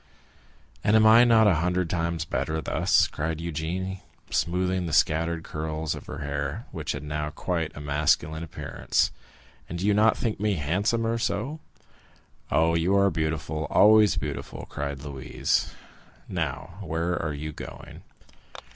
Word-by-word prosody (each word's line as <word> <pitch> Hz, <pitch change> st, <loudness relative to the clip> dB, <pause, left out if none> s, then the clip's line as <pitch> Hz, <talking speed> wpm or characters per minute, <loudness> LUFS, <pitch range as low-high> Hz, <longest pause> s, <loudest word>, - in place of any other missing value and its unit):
"And 105 Hz, -, +4 dB
am 110 Hz, 0 st, +6 dB
I 115 Hz, +2 st, +8 dB
not 115 Hz, -2 st, +5 dB
a 105 Hz, -, +5 dB
hundred 90 Hz, 0 st, +1 dB
times 85 Hz, -1 st, -1 dB
better 80 Hz, 0 st, -2 dB
thus?" -, -, +3 dB
cried 80 Hz, +1 st, -3 dB
Eugénie, 85 Hz, +4 st, -3 dB, 0.3 s
smoothing 90 Hz, +1 st, 0 dB
the 80 Hz, -, -4 dB
scattered 80 Hz, +2 st, +2 dB
curls 80 Hz, 0 st, -3 dB
of -, -, -9 dB
her -, -, -6 dB
hair, 70 Hz, 0 st, -3 dB
which -, -, -3 dB
had 70 Hz, -, -6 dB
now 75 Hz, 0 st, -3 dB
quite 80 Hz, 0 st, -2 dB
a -, -, -6 dB
masculine 75 Hz, +2 st, +1 dB
appearance; 85 Hz, -, -1 dB, 0.6 s
"and 85 Hz, -, -4 dB
do 90 Hz, -, -2 dB
you 105 Hz, -, +4 dB
not 105 Hz, +2 st, +4 dB
think 115 Hz, -5 st, -2 dB
me 105 Hz, -1 st, +1 dB
handsomer 110 Hz, +9 st, 0 dB
so?" 125 Hz, +7 st, -2 dB, 0.9 s
"Oh, 80 Hz, +1 st, +3 dB
you 85 Hz, +4 st, +2 dB
are 100 Hz, 0 st, +4 dB
beautiful—always 80 Hz, +7 st, +3 dB
beautiful!" 75 Hz, -2 st, -5 dB
cried 70 Hz, -1 st, -4 dB
Louise. 70 Hz, -2 st, -1 dB, 0.6 s
"Now, 85 Hz, +3 st, -4 dB
where 85 Hz, 0 st, -1 dB
are 75 Hz, -2 st, -2 dB
you 75 Hz, +2 st, -5 dB
going?" -, -, -10 dB
85 Hz, 145 wpm, -26 LUFS, 75-100 Hz, 0.9 s, I